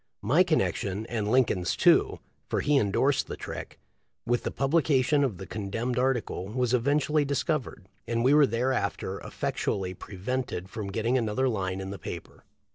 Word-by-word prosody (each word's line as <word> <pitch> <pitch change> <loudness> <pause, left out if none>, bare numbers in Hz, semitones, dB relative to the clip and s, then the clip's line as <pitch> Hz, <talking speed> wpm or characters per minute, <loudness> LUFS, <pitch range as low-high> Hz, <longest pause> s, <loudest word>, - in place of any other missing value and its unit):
My 145 - +4
connection, 105 - 0
and 110 -3 -2
Lincoln's 110 -8 +2
too, - - +4 0.2
— - - -44
for - - 0
he 145 0 +2
endorsed 130 +7 +1
the - - -6
trick, - - -7 0.3
— - - -51
with 120 0 +1
the - - -2
publica 140 -1 +2
tion 145 +2 +2
of 120 -9 -1
the 95 - -7
condemned 115 +5 -3
article 125 -7 -1
was 125 +3 -1
eventually 145 +4 +2
dis 140 -1 -1
covered, 135 - -3 0.2
and 115 0 0
we 130 +3 +5
were 150 -2 +6
thereafter 115 -5 -1
effectually 95 -2 -2
pre 95 - -11
vented 100 -2 -3
from 100 -3 -5
getting 115 +5 +1
another 120 +3 0
line 95 -5 -1
in 95 0 -5
the 100 - -7
paper. - - -8
120 Hz, 180 wpm, -28 LUFS, 100-135 Hz, 0.3 s, were